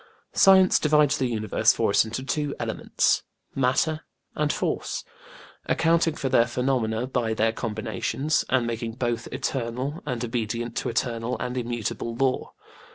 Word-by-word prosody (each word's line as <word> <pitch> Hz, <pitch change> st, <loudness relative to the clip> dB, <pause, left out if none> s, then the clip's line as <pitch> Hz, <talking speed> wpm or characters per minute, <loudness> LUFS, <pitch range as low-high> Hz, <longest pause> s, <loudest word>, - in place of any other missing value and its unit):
Science 190 Hz, -1 st, +6 dB
divides 150 Hz, -2 st, +3 dB
the 130 Hz, -, +1 dB
universe 110 Hz, -1 st, +2 dB
for 110 Hz, -3 st, +1 dB
us -, -, +5 dB
into 115 Hz, +4 st, -5 dB
two 145 Hz, +1 st, -2 dB
elements -, -, +1 dB, 0.3 s
matter 135 Hz, +4 st, +1 dB, 0.3 s
and 150 Hz, -1 st, 0 dB
force; -, -, -2 dB, 0.6 s
accounting 165 Hz, -1 st, +2 dB
for 135 Hz, -, -2 dB
their 120 Hz, -2 st, +4 dB
phenomena 125 Hz, -2 st, 0 dB
by 120 Hz, -4 st, -1 dB
their 110 Hz, +1 st, +2 dB
combinations, 130 Hz, +6 st, -1 dB
and 130 Hz, -2 st, +2 dB
making 115 Hz, -1 st, -3 dB
both 120 Hz, -1 st, -2 dB
eternal 130 Hz, +3 st, -3 dB
and 125 Hz, -3 st, -2 dB
obedient 115 Hz, 0 st, -3 dB
to -, -, -1 dB
eternal 115 Hz, 0 st, -1 dB
and 125 Hz, 0 st, -3 dB
immutable 120 Hz, -1 st, -3 dB
law. 130 Hz, +1 st, 0 dB
125 Hz, 140 wpm, -25 LUFS, 115-135 Hz, 0.6 s, Science